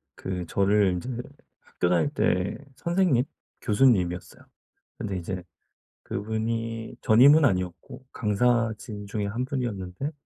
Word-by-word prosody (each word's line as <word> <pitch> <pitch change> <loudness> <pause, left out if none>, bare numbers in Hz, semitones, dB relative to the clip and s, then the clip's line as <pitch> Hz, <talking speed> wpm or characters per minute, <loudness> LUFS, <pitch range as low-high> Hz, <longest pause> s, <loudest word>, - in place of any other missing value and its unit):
그 90 -2 -4
저를 100 0 +3
인제 90 +8 -4 0.5
학교 90 - -2
다닐 90 +10 +2
때 90 -10 0 0.2
선생님, 170 -6 +2 0.4
교수님이었어요. 105 -6 +1 0.5
근데 100 -3 -3
이제 90 +1 -5 0.6
그분이 115 +1 -3
전임은 140 +8 +7
아니었고 90 +2 -1
강사진 110 -1 0
중에 100 0 -2
1 115 +5 -2
분이었는데 120 -3 -3
110 Hz, 260 characters per minute, -26 LUFS, 95-125 Hz, 0.6 s, 전임은